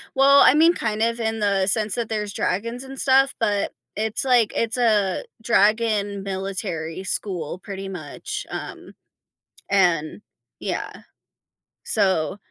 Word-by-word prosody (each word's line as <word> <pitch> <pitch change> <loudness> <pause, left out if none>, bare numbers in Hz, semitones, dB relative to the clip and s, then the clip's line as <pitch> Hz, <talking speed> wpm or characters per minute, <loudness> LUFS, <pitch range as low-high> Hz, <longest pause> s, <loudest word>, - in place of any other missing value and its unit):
well, 275 +1 +6
I - - +7
mean, 325 +3 +5
kind 215 -8 -2
of 230 +1 +1
in 225 -1 -2
the 200 -2 +1
sense 215 0 +2
that 235 -2 -2
there's 210 -2 -3
dragons 230 +7 -2
and 270 0 -10
stuff, 270 0 +4
but 205 -3 0 0.2
it's, 215 0 -1
like, 245 -5 +3
it's 230 +2 -1
a 210 -5 +2 0.2
dragon 210 -2 +1
military 190 -3 -4
school 180 -4 -3
pretty 195 0 -7
much, 155 -6 -6
um, - - -8 0.8
and 175 -3 +1 0.4
yeah, - - -3 0.9
so, 190 - +1
210 Hz, 130 wpm, -23 LUFS, 195-230 Hz, 0.9 s, I